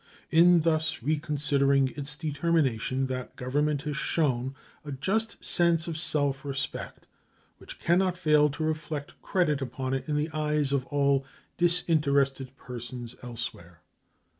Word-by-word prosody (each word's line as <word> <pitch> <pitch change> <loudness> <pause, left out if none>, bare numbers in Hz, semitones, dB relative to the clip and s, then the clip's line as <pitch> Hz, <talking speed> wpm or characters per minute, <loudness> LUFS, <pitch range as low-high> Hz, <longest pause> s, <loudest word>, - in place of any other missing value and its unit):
In 170 +1 +6
thus 160 -5 0
reconsidering 140 -2 +2
its 145 0 -4
determination 145 -5 0
that 130 -1 -5
Government 145 +3 -1
has 150 -2 -3
shown 135 -5 0 0.3
a 150 - -7
just 200 +11 -2
sense 170 -2 +3
of 165 - -3
self 145 -3 -1
respect 135 -1 -5 0.5
which - - -11
can 175 +2 +2
not 185 -2 0
fail 150 -3 +4
to 150 +3 -4
reflect 155 -2 -3
credit 150 -7 +1
upon 130 0 -3
it 135 +2 -3
in 150 - 0
the 150 +2 -1
eyes 150 -2 0
of 135 -1 0
all 140 -1 +2 0.3
disinterested 140 -6 +2
persons 120 -1 -8
elsewhere. 115 -9 -7
145 Hz, 135 wpm, -28 LUFS, 135-160 Hz, 0.5 s, In